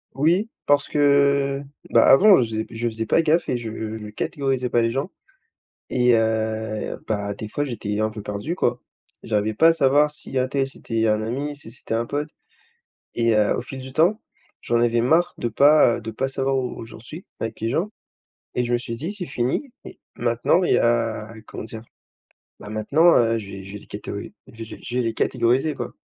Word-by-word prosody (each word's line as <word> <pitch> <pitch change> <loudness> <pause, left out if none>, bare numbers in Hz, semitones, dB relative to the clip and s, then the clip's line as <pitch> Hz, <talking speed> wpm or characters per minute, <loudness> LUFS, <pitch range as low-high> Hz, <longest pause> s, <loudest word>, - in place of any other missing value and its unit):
Oui, 175 +10 +2 0.2
parce 145 0 +3
que 140 -1 +3 0.3
bah - - +5
avant, 200 +8 +8
je - - +3
faisais 110 -1 -2
p - - -13
je 120 +1 -1
faisais 110 0 -3
pas 165 - +3
gaffe 160 +2 +1
et 125 - +1
je 110 -1 -5
je 105 -1 -8
catégorisais 130 +3 -2
pas 120 0 +2
les 115 - +2
gens 135 +9 -3 0.8
et 125 -1 +3
heu, 110 -1 -1
bah 100 -2 -2
des 105 +1 -7
fois, 145 +6 -2
j'étais 105 -5 -3
un 110 0 +1
peu 105 -1 -8
perdu 105 +11 -4
quoi. - - 0 0.4
J'arrivais 110 0 0
pas 165 +9 +5
à - - +6
savoir 150 -1 +3
si 150 -2 -7
untel 135 +1 0
c'était 115 -4 -2
un 105 0 +2
ami, 140 +6 -3
si 125 -6 -8
c'était 115 - -5
un 115 +1 0
pote 145 +3 -3 0.9
et 115 -1 +2
heu, 105 -1 +3
au - - -2
fil 130 +1 -8
du 130 0 -9
temps, 180 +9 +3 0.4
j'en 120 - 0
avais 120 0 +2
marre 160 +8 +3
de 120 - -2
pas, 140 0 +5
heu, 120 - -9
de 110 0 -6
pas 135 - -2
savoir 135 0 0
où 125 -3 -3
j'en 115 - -12
suis 155 +10 -9
avec 115 0 -4
les 115 - -1
gens 175 - -1 0.6
et 125 - +1
je 120 - -2
me 120 - +3
suis 115 -1 -4
dit: 165 - -4
«C'est 190 -4 -5
fini 130 - -2
il - - -10 0.2
maintenant 120 +9 +2
il - - +2
y - - +5
a» 115 -2 0
comment - - -7
dire? 110 0 -7 0.8
Bah 105 - -9
maintenant, 150 +11 +4
heu, 115 -1 +3
je 100 -2 -8
vais 95 -1 -8
je 95 - -10
vais - - -5
les - - -17
catéo - - -6
ais - - -8 0.2
j'ai 115 0 -9
je 120 - -5
vais 125 - +2
les 115 -1 -2
catégoriser 130 +7 +1
quoi». - - -5
120 Hz, 215 wpm, -23 LUFS, 110-140 Hz, 0.9 s, avant